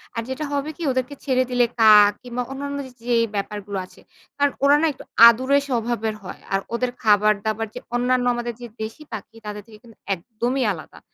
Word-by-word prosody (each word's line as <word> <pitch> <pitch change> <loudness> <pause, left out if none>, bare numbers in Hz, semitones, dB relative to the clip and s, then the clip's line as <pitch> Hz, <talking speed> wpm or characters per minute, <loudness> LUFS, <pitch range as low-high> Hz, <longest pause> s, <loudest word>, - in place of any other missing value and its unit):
আর 230 - -1
যেটা 280 +4 -3
হবে 285 +2 -1
কি? 340 - -6
ওদেরকে 255 +2 -2
ছেড়ে 255 -2 +2
দিলে 245 -1 +3
কাক 210 -2 +8
কিংবা 245 0 -3
অন্যান্য 280 +1 -4
যে, - - -14 0.2
যে 240 - +3 0.2
ব্যাপারগুলো 200 0 -4
আছে। - - -20 0.4
কারণ 285 0 +2
ওরা 280 +1 +6
না - - +3
একটু - - -13 0.2
আদুরে 260 +4 +4
স্বভাবের 230 -3 -1
হয়। 185 - -9
আর 195 - +3
ওদের 245 +1 0
খাবার-দাবার 215 +1 +2
যে - - -4 0.2
অন্যান্য 250 0 +1
আমাদের 240 0 -3
যে 240 - -6
দেশী 225 +8 -6
পাখি, 220 +1 -8
তাদের 210 0 -6
থেকে 215 - -14
কিন্তু 230 -2 -17 0.2
একদমই 240 +7 -2
আলাদা। 160 -4 -9
240 Hz, 190 wpm, -22 LUFS, 215-255 Hz, 0.4 s, কাক